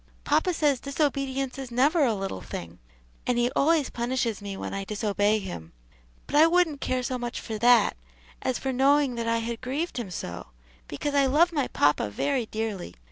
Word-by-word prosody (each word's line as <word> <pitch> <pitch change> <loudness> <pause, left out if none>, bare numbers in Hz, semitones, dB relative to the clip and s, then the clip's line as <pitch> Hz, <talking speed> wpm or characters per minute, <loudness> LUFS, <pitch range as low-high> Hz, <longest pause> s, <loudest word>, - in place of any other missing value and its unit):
"Papa 365 - +2
says 295 -6 +1
disobedience 275 -2 -1
is 265 -2 -6
never 285 +7 +3
a 235 -5 +2
little 195 - -4
thing, 85 +1 -8 0.5
and 245 - +2
he 240 +1 +2
always 305 0 +2
punishes 235 -3 -1
me 200 -1 -6
when - - -5
I 195 0 -3
disobey 205 0 +1
him; 175 - -7 0.5
but - - -5
I 310 +2 +7
wouldn't 330 -4 +2
care 255 0 -1
so 250 +1 -2
much 240 0 -4
for 220 -2 -5
that, 240 -1 +5 0.5
as 255 - -1
for 265 -1 -3
knowing 275 +1 +3
that 230 -1 -3
I 230 0 +2
had 230 0 -4
grieved 275 +7 -3
him 225 -5 -5
so; 90 - -6 0.4
because 290 - -3
I 280 -1 +4
love 330 +6 +3
my 285 -5 0
papa 145 -7 +2
very 250 - -1
dearly. 215 - -4
250 Hz, 190 wpm, -26 LUFS, 215-280 Hz, 0.5 s, I